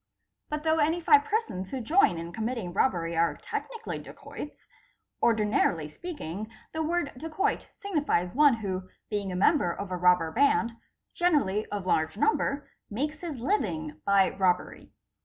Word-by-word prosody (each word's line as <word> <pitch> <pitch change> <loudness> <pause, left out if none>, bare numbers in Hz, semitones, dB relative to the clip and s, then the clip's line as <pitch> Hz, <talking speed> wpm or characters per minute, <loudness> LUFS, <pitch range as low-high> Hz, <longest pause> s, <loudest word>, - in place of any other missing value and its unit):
But 300 0 -3
though 320 0 +2
any 320 +3 +2
five 430 +6 +5
persons 315 - -2
who 265 - -3
join 300 - +3
in 170 +1 -6
committing 225 -5 -3
robbery 170 -8 +1
are 170 +1 +2
technically 465 -2 -5
dacoits, 295 - -10 0.6
ordinarily 210 -8 +2
speak 340 - -8
ing 195 +7 -5 0.2
the 320 - -2
word 320 -2 0
dacoit 325 +5 -1
signifies 295 - 0
one 290 -2 +6
who, 190 -4 -4 0.2
being 200 -2 -2
a - - -3
member 190 - +3
of 195 +2 -6
a 180 - -1
robber 180 -2 +4
band, 235 - +3 0.4
generally 280 - +1
of 205 -3 -4
large 160 0 +1
number, 290 +1 +1 0.2
makes 295 +8 -3
his 330 -6 -5
living 170 - -1
by 200 -1 +4
robbery. 185 -2 0
225 Hz, 150 wpm, -28 LUFS, 180-305 Hz, 0.6 s, one